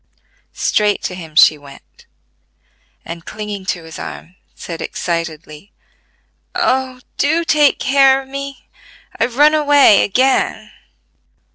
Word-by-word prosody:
Straight 210 -1 0
to - - -3
him 165 -4 -10
she 155 -1 +6
went, 140 -1 -17 1.0
and 170 0 -8
clinging 205 0 -7
to 175 -3 -3
his 160 0 -10
arm 175 +3 -9 0.2
said 165 -2 -8
excitedly: 165 +1 -5 0.8
"Oh, 260 -7 -1 0.2
do 320 +4 +1
take 300 -3 +3
care 270 0 +3
of - - -19
me: 275 0 -8 0.5
I've 235 +1 -1
run 300 +2 +5
away 290 -7 +5
again!" 260 +6 0
220 Hz, 115 wpm, -17 LUFS, 170-275 Hz, 1.0 s, she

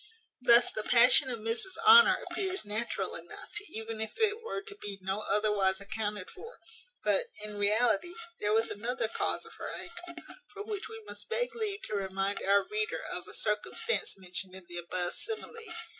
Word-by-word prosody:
Thus 240 0 +7
the 215 - -3
passion 250 +4 +6
of 245 - -2
Mrs 230 - -2
Honour 460 +2 +8
appears 380 - -2
natural 215 +3 -2
enough, - - -4 0.2
even 220 0 -5
if 220 - -4
it 440 0 +1
were 450 -3 -4
to 410 -1 -8
be 205 - -6
no 190 +2 -2
otherwise 210 -3 +2
accounted 205 -1 -3
for; 460 +5 -11 0.5
but, - - +2 0.2
in 210 0 -6
reality, 220 - +3 0.2
there 210 - 0
was 225 +1 +3
another 235 +3 -2
cause - - -1
of - - -13
her - - -4
anger; 345 -2 -7 0.3
for 410 - -5
which 425 0 -5
we 445 0 -9
must - - -7
beg - - -1
leave 425 -3 -3
to - - -6
remind 195 0 -1
our 200 +1 +4
reader 430 0 -2
of - - -5
a - - -10
circumstance 460 - -1
mentioned 185 0 -6
in 190 -1 -10
the 175 - -7
above 175 +1 -1
simile. 445 0 -5
230 Hz, 175 wpm, -31 LUFS, -, 0.5 s, Honour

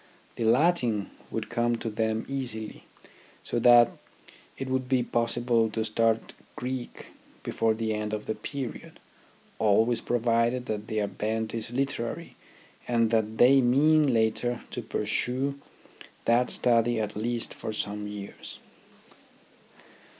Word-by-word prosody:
The 115 - -2
Latin 120 - +2 0.2
would 110 -1 -4
come 120 0 +1
to 115 - -5
them 110 0 -1
easily, 125 -6 -5 0.6
so 120 - -2
that 120 0 +7 0.7
it 135 - -4
would 130 -1 -1
be 130 -2 +3
possible 120 -1 +1
to 110 0 -2
start 115 0 0 0.2
Greek 125 0 -6 0.3
before 110 -1 +1
the 110 -1 -1
end 105 0 -3
of 105 0 -4
the - - -1
period, 135 0 -7 0.6
always 110 +2 +3
provided 120 +1 +1
that 105 -2 -4
their 110 -1 0
bent 110 +2 -3
is 115 0 -3
literary 135 +4 -3 0.5
and 115 -2 +2
that 110 -1 0
they 135 +4 +6
mean 145 +4 +4
later 115 +1 +1
to - - -4
pursue 135 +3 -1 0.7
that 120 +2 +3
study 120 -1 +2
at 105 -1 -3
least 115 +2 -2
for - - -5
some 105 -1 -3
years. 105 -1 -8
115 Hz, 130 wpm, -27 LUFS, 110-125 Hz, 0.7 s, that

